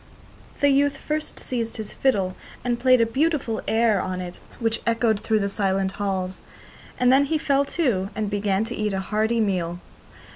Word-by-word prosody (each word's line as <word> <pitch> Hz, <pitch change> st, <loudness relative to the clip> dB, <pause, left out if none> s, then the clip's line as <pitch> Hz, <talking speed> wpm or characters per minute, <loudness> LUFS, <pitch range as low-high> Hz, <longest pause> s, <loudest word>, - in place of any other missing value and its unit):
The 285 Hz, -, +5 dB
youth 280 Hz, +1 st, +3 dB
first 305 Hz, 0 st, -3 dB
seized 230 Hz, -3 st, -3 dB
his 220 Hz, -2 st, -5 dB
fiddle 195 Hz, -9 st, +1 dB, 0.3 s
and 240 Hz, -1 st, -1 dB
played 255 Hz, -1 st, +5 dB
a -, -, +5 dB
beautiful 265 Hz, -2 st, 0 dB
air 220 Hz, -3 st, +3 dB
on 185 Hz, 0 st, -3 dB
it 180 Hz, -1 st, -6 dB, 0.2 s
which 225 Hz, -1 st, 0 dB
echoed 230 Hz, -2 st, +2 dB
through 220 Hz, +1 st, +1 dB
the 200 Hz, -, +1 dB
silent 195 Hz, -1 st, 0 dB
halls, 190 Hz, -2 st, -3 dB, 0.6 s
and 250 Hz, 0 st, +5 dB
then 280 Hz, +1 st, +5 dB
he 315 Hz, +3 st, 0 dB
fell 280 Hz, -2 st, +2 dB
to 240 Hz, -, 0 dB
and 215 Hz, 0 st, -1 dB
began 200 Hz, 0 st, 0 dB
to 225 Hz, -, -4 dB
eat 210 Hz, -1 st, -1 dB
a 190 Hz, -, -1 dB
hearty 220 Hz, +4 st, 0 dB
meal. 180 Hz, -5 st, 0 dB
220 Hz, 180 wpm, -24 LUFS, 195-255 Hz, 0.6 s, The